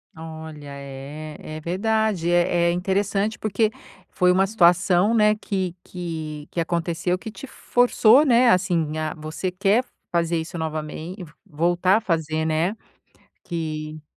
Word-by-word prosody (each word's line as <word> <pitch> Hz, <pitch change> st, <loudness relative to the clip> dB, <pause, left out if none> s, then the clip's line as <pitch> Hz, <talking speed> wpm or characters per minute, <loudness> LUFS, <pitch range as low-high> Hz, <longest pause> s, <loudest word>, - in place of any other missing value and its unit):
Olha, 160 Hz, -2 st, -9 dB
é, 140 Hz, +3 st, -8 dB
é 155 Hz, 0 st, -7 dB
verdade 195 Hz, +1 st, 0 dB
é 175 Hz, 0 st, +3 dB
é -, -, +3 dB
interessante, 195 Hz, +3 st, 0 dB
porque 215 Hz, +1 st, +1 dB, 0.4 s
foi 180 Hz, 0 st, +3 dB
uma 190 Hz, +1 st, +3 dB
situação, 180 Hz, 0 st, +4 dB
né, 210 Hz, -1 st, +5 dB
que 190 Hz, -4 st, -3 dB
que 160 Hz, -4 st, -6 dB
que 170 Hz, -, -3 dB
aconteceu 170 Hz, +1 st, -1 dB
que 220 Hz, -, -8 dB
te 275 Hz, +4 st, -10 dB
f-forçou, 245 Hz, +2 st, +4 dB
né, 245 Hz, -3 st, +5 dB
assim, 170 Hz, -4 st, +1 dB
a 155 Hz, -1 st, -2 dB
você 155 Hz, +4 st, -4 dB
quer 195 Hz, +6 st, +2 dB, 0.3 s
fazer 170 Hz, -1 st, +1 dB
isso 160 Hz, +2 st, -5 dB
novame 160 Hz, +2 st, -4 dB, 0.3 s
voltar 175 Hz, +3 st, +2 dB
a -, -, -2 dB
fazer, 160 Hz, -4 st, -1 dB
né, 160 Hz, +6 st, 0 dB, 0.7 s
que 155 Hz, -2 st, -5 dB
175 Hz, 135 wpm, -23 LUFS, 160-195 Hz, 0.7 s, né